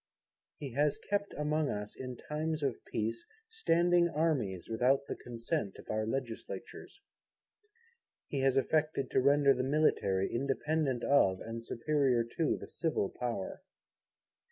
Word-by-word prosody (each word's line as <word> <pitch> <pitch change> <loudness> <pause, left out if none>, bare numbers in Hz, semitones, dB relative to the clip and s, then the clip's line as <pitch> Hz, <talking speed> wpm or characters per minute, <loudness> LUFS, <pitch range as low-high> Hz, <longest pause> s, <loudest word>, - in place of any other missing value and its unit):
He 140 -3 -6
has 145 +2 +2
kept 200 0 -2
among 150 0 +1
us, 105 0 -4
in 125 -2 -6
times 155 0 -3
of 135 -4 -1
peace, 115 +1 -2 0.3
Standing 175 - +3
Armies 140 - 0
without 125 +5 +2
the - - -4
Consent 120 - -3
of - - -8
our 110 0 -1
legislatures. 120 - -5 1.3
He 140 - -2
has 135 0 +3
affected 150 0 +1
to - - +3
render 140 +1 +5
the 125 - -1
Military 130 -9 +2
independent 135 0 0
of 95 -10 +4
and 115 +1 -6
superior 130 0 +1
to 160 - +1
the - - -9
Civil 160 - -1
Power. 120 -6 -4
135 Hz, 130 wpm, -32 LUFS, 115-155 Hz, 1.3 s, render